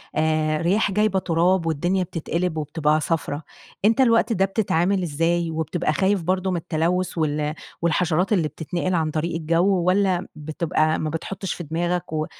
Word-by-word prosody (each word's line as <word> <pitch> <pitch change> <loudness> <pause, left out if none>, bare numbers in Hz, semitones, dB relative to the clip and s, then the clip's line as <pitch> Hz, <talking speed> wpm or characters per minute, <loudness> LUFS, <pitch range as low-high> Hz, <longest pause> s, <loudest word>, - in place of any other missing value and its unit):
آآ 155 -1 +1
رياح 195 +5 +2
جايبة 210 -1 +2
تراب 175 0 +1
والدنيا 175 +4 0
بتتقلب 170 0 -3
وبتبقى 155 0 0
صفرا، 155 -2 -2 0.4
أنت 225 +4 +4
الوقت 230 -2 +3
ده 195 -2 +2
بتتعامل 195 -2 +1
ازاي؟ 165 +2 0
وبتبقى 160 +1 -1
خايف 195 +2 +1
برضو 185 +2 0
من 180 - 0
التلوث 175 +2 -1
وال 150 -1 0 0.3
والحشرات 170 +3 +1
اللي 170 -6 +2
بتتنقل 170 +4 -3
عن 160 -2 0
طريق 165 +2 -2
الجو، 170 +4 +2
والّا 185 0 +2
بتبقى 155 +1 0
ما 155 - -2
بتحطش 185 +4 -4
في 175 - -7
دماغك 170 +2 -2
و 155 0 0
170 Hz, 155 wpm, -23 LUFS, 155-185 Hz, 0.4 s, أنت